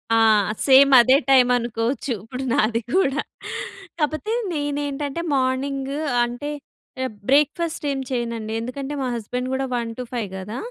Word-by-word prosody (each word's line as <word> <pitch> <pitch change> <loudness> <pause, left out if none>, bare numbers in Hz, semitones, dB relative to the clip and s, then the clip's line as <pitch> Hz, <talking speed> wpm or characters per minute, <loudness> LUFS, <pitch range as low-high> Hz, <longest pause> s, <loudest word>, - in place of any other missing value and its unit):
ఆ! - - +4 0.5
సేమ్ 275 +1 +7
అదే 255 +3 +5
టైం 260 -2 +6
అనుకోవచ్చు 240 +2 -2
ఇప్పుడు 250 +4 -6
నాది 230 -3 +2
కూడా. 295 -6 +2 0.8
కాకపోతే 310 +8 -1 0.2
నేనేంటంటే 290 +1 -2
మార్నింగ్, 270 +1 -1 0.3
అంటే 245 +5 -5 0.8
బ్రేక్‌ఫాస్ట్ 300 +3 +2
ఏం 270 - -2
చేయనండి. 230 -3 -3
ఎందుకంటే, 270 +4 -5
మా 260 - -1
హస్బెండ్ 250 +3 -4
కూడా 265 0 -1
1-5 235 -1 -4
కదా 210 +5 -6
265 Hz, 120 wpm, -22 LUFS, 240-285 Hz, 0.8 s, సేమ్